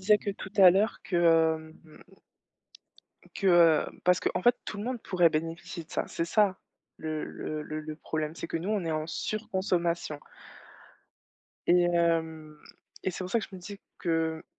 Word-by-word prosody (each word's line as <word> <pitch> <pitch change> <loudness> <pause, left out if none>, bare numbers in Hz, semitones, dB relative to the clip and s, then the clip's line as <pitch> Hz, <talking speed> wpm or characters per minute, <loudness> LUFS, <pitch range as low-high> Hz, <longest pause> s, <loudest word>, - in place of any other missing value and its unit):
disais 210 +2 +4
que 200 - -3
tout 195 0 -8
à 185 -3 +9
l'heure 200 +4 +1
que, 180 - -2 0.8
hem - - -15 1.4
que, 195 - -1 0.4
heu, - - -17
parce 180 0 +4
qu'en - - -1
fait 240 0 +5
tout 205 - -6
le 210 - -4
monde 250 -2 -4
pourrait 175 -3 +3
bénéficier 165 +2 -4
de - - -28
ça. - - -1
C'est 165 - -2
ça 195 +1 +2 0.4
le 155 -1 -3
le 155 0 -5
le 155 +1 -5
le 155 0 -7
problème, 155 0 -3
c'est - - -6
que - - -2
nous 180 +6 -3
on 210 -3 0
est 165 - -1
en 155 0 -2
surconsommation 175 -5 -2 1.5
et 175 0 +5
hem, 160 -3 0 0.5
et 190 - 0
c'est 185 +1 -6
pour 180 - -6
ça 230 +2 +2
que - - -6
je 195 - -11
me 185 - -9
disais 200 +2 -9 0.2
que 160 -1 -1
175 Hz, 180 wpm, -29 LUFS, 160-195 Hz, 1.5 s, à